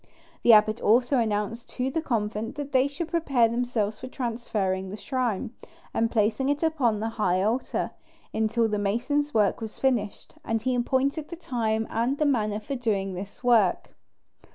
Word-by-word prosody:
The 240 - +6
abbot 215 0 +5
also 245 +4 +3
announced 220 +1 -2
to 260 +1 -1
the 325 - -1
convent 220 -5 -2
that 290 -1 -5
they 260 0 +4
should 320 +4 -5
prepare 280 -8 +2
themselves 230 -3 -1
for - - -7
transferring 215 -7 -2
the 205 - -6
shrine, 225 0 -2 0.4
and 225 0 +1
placing 225 +4 +1
it 290 +2 0
upon 265 -10 +1
the 225 +1 -2
high 185 -1 +2
altar, 230 +5 -1 0.4
until 220 +1 +1
the 210 -1 -1
masons' 250 +9 0
work 210 +1 +2
was 220 -1 -6
finished; 235 -6 -1
and 225 0 0
he 255 +3 -1
appointed 265 +5 0
the 340 - -6
time 225 -8 -1
and 240 +5 0
the 305 - +1
manner 215 -7 +1
for 245 +6 -6
doing 205 -7 -1
this 195 +6 -8
work. 225 -7 +3
230 Hz, 170 wpm, -26 LUFS, 210-260 Hz, 0.4 s, The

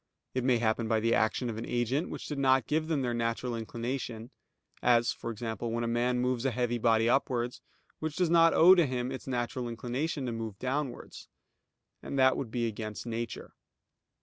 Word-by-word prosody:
It 130 - -1
may 125 -1 +3
happen 115 0 0
by 110 -1 +2
the 115 +1 +2
action 115 +2 +1
of 110 -2 -4
an 115 - -5
agent 120 +7 0
which - - -6
did 145 -2 -4
not 130 -3 +4
give 155 +4 0
them 155 -5 0
their 120 -1 -1
natural 115 +1 -1
inclination; 115 0 -4 0.5
as, 120 -1 +4
for - - -6
example, 115 0 -4
when 115 +1 -1
a - - -1
man 120 +1 +1
moves 125 -1 0
a 135 - +2
heavy 120 -1 -1
body 115 -1 +3
upwards, 125 -1 0 0.4
which 155 -1 -3
does 180 -3 +1
not 165 -1 +6
owe 180 +3 +8
to 175 -5 +4
him 125 0 -2
its 130 - -7
natural 120 -1 -2
inclination 130 +5 -3
to 120 - -2
move 115 -3 -5
downwards; 130 +1 -4 0.7
and 140 - -5
that 130 0 +5
would 130 - -4
be 120 0 -1
against 110 -1 -5
nature. 115 0 -5
120 Hz, 195 wpm, -30 LUFS, 115-130 Hz, 0.7 s, owe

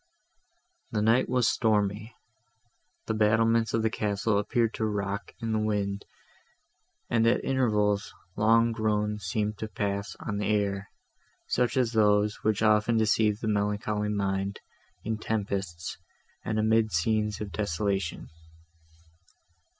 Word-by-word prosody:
The 105 - -1
night 115 +4 +3
was 125 -2 +2
stormy; 105 0 0 0.9
the 110 - -1
battlements 115 +1 +3
of 115 - 0
the 110 - +1
castle 105 0 0
appeared 115 +2 0
to 110 - -2
rock 100 -1 -3
in 115 -2 -3
the 110 - +1
wind, 100 -2 -1 1.0
and, 115 -1 +2
at 115 - +2
intervals, 105 -6 +1 0.2
long 115 +2 +4
groans 105 -2 -1
seemed 105 +3 -2
to 110 - -3
pass 100 -1 -3
on 105 -2 -4
the 105 - -1
air, 100 -2 0 0.6
such 125 +1 0
as 125 -3 +2
those, 105 -1 +3
which 110 0 +1
often 110 +2 +3
deceive 110 0 +2
the 110 - -2
melancholy 105 0 0
mind, 100 -1 -1 0.4
in 110 0 -2
tempests, 100 -6 -3 0.4
and 110 - -2
amidst 110 -3 +2
scenes 105 +3 0
of 105 -2 -5
desolation. 95 0 -2
105 Hz, 125 wpm, -28 LUFS, 100-110 Hz, 1.0 s, long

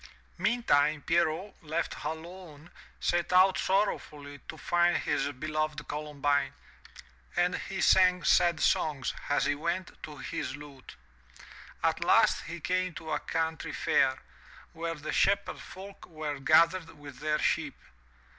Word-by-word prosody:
Meantime, 155 -11 +2
Pierrot, 170 +4 +1
left 160 +1 -3
alone, 160 0 -8 0.3
set 175 0 0
out 185 +1 +6
sorrowfully 150 -7 -1
to - - -7
find 175 0 +2
his 145 -1 -1
beloved 155 +1 -3
Columbine, 145 -2 -1 0.8
and 175 +1 +2
he 190 -1 -5
sang 180 -1 +5
sad 170 -2 +4
songs, 145 -4 +1 0.2
as 145 - +2
he - - +2
went, 170 +5 -3
to 150 -1 -9
his 130 0 -4
lute. 145 - -12 0.9
At - - +1
last - - +4
he 170 +1 -6
came 185 +1 -1
to 160 -1 -7
a - - 0
country 160 -1 -3
fair, - - +2 0.6
where 165 0 -4
the 150 0 -5
shepherd 200 0 +1
folk 195 +1 -11
were 155 -4 -5
gathered 165 +3 +3
with 145 -3 -11
their 150 0 0
sheep. - - 0
160 Hz, 130 wpm, -29 LUFS, 150-180 Hz, 0.9 s, out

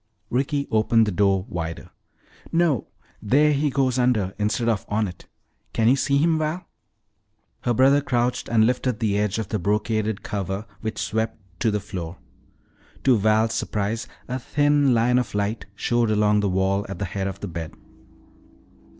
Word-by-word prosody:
Ricky 140 +3 0
opened 110 +1 +3
the 105 - -1
door 95 0 +2
wider. 85 -1 -5 0.6
"No, 165 - +2 0.3
there 145 +7 +3
he 145 +1 +1
goes 130 -2 +1
under 110 -7 +1
instead 105 +3 0
of 110 -4 +1
on 105 0 +1
it. 90 -1 -11 0.5
Can 110 - +2
you 125 - +6
see 140 +1 +1
him, 160 +2 +3
Val?" 155 +4 -2 1.0
Her 120 - +2
brother 135 +3 +5
crouched 125 -2 -1
and 110 -2 +4
lifted 125 -1 0
the 110 -4 +1
edge 105 -1 0
of 110 -3 -3
the 105 - -1
brocaded 105 +2 -1
cover 95 +1 -3
which 110 -1 -4
swept 110 +3 -2 0.2
to 115 - +2
the 105 -1 0
floor. 90 -3 -6 0.9
To 130 -2 +5
Val's 110 +1 +2
surprise 110 +2 -2 0.2
a 125 +1 -3
thin 145 0 +2
line 125 +2 +3
of 120 -4 -4
light 105 +2 -2
showed 120 +2 +1
along 105 -1 +3
the 100 -1 +1
wall 95 +2 +1
at 95 - -5
the 95 - -2
head 95 +2 -3
of 95 0 -5
the 100 - -4
bed. 80 -2 -6
110 Hz, 165 wpm, -24 LUFS, 100-125 Hz, 1.0 s, you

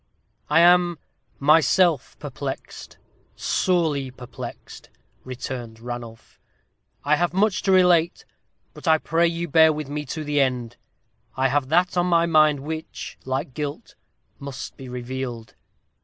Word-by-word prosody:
"I 165 - +5
am 175 0 +5 0.4
myself 155 +1 +3
perplexed - - -7 0.4
sorely 160 -7 0
perplexed," 125 -1 -10 0.3
returned 125 -3 -7
Ranulph. 120 -1 -9 0.6
"I 150 +1 +3
have 175 +2 -1
much 205 0 +2
to 195 - +1
relate; 180 -2 +3 0.5
but - - -11
I 160 0 +6
pray 165 +2 +1
you 170 +1 -3
bear 160 +1 +5
with 150 -2 -5
me 150 +1 -3
to 155 +4 -5
the 145 -1 +1
end. 125 -3 -1 0.6
I 135 0 +2
have 140 -1 0
that 175 +4 +2
on 175 0 +2
my 170 -1 +3
mind 155 -3 +4
which, 160 +2 -7
like 130 0 -3
guilt, 145 0 -5 0.5
must 140 0 -7
be 130 -2 -10
revealed." 125 -2 -6
150 Hz, 130 wpm, -23 LUFS, 130-170 Hz, 0.6 s, I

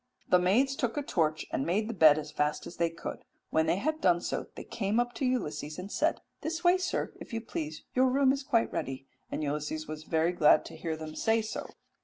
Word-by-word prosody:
"The 180 - +7
maids 240 +10 +3
took 245 -1 -2
a 290 - 0
torch, 155 - 0
and 135 - 0
made 200 +7 0
the 230 - -3
bed 155 -6 +7
as 150 -1 -5
fast 150 0 -1
as - - -9
they 170 -1 +2
could: 165 - -7 0.3
when 160 0 +2
they 160 - +3
had 310 +10 -1
done 175 -2 +4
so - - -3
they - - -7
came 210 +1 -1
up 240 0 0
to 265 - -2
Ulysses 155 -11 -2
and 185 +3 -7
said, - - +1 0.2
'This 330 +2 -3
way, 360 +1 +5
sir, 365 -1 -2
if - - -10
you 225 - 0
please, 155 -8 -5
your 260 +1 +4
room 265 +1 +4
is 275 0 -1
quite 230 -4 +1
ready'; 135 0 -3 0.3
and - - -2
Ulysses 150 +2 -3
was 155 0 -6
very 160 +1 +1
glad 160 -4 +5
to - - -9
hear 160 0 -3
them 155 0 -7
say 225 +6 +1
so." 215 - -5
180 Hz, 235 wpm, -30 LUFS, 155-245 Hz, 0.3 s, The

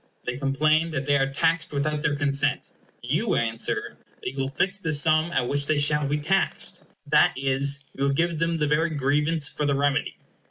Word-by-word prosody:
They 125 - -3
complain 155 +4 +1
that 140 -4 -3
they 145 0 +2
are 135 0 0
taxed 165 +3 0
without 150 +1 -1
their 150 -2 0
consent, 140 -1 0 0.3
you - - 0
answer, 115 -1 -1 0.3
that - - -3
you 135 - -8
will 135 0 -1
fix 195 +8 -1
the 160 -5 -1
sum 155 +2 +3
at 125 -6 0
which 140 +1 -1
they 155 - +1
shall 150 0 +2
be 145 +1 0
taxed. 185 +6 0 0.2
That - - +4
is, 135 +1 0
you 140 +1 0
give 165 +3 0
them 165 0 0
the 155 -2 0
very 155 +3 +1
grievance 150 +1 +1
for 150 - -3
the 140 - +1
remedy. 145 +1 0
145 Hz, 195 wpm, -24 LUFS, 140-155 Hz, 0.3 s, That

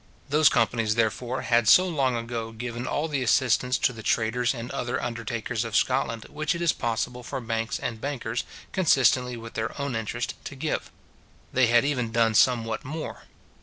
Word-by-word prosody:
Those 150 +1 +5
companies, 110 -2 +1
therefore, 120 +3 -1
had 120 -1 +2
so 185 +10 +7
long 135 -7 +1
ago 115 -1 -4
given 120 +1 -5
all 150 +2 -1
the 145 -4 -2
assistance 125 0 +2
to 125 - +1
the 115 - -9
traders 115 +3 +1
and 120 -2 -6
other 120 +1 -2
undertakers 115 -1 -3
of 115 -2 -5
Scotland 115 -2 +1
which 155 +2 -2
it 170 - -4
is 170 - +3
possible 120 +1 -2
for 125 - -5
banks 115 -1 -2
and 110 -2 -4
bankers, 125 -5 -3 0.3
consistently 130 -8 +3
with 115 0 -9
their 110 +5 -3
own 140 -3 -2
interest, 115 +2 -3
to - - -6
give. 150 +3 -2 0.6
They 130 -1 +4
had 120 +2 +4
even 125 -6 -1
done 115 -1 +3
somewhat 115 -1 +2
more. 155 +3 -6
120 Hz, 175 wpm, -26 LUFS, 115-130 Hz, 0.6 s, so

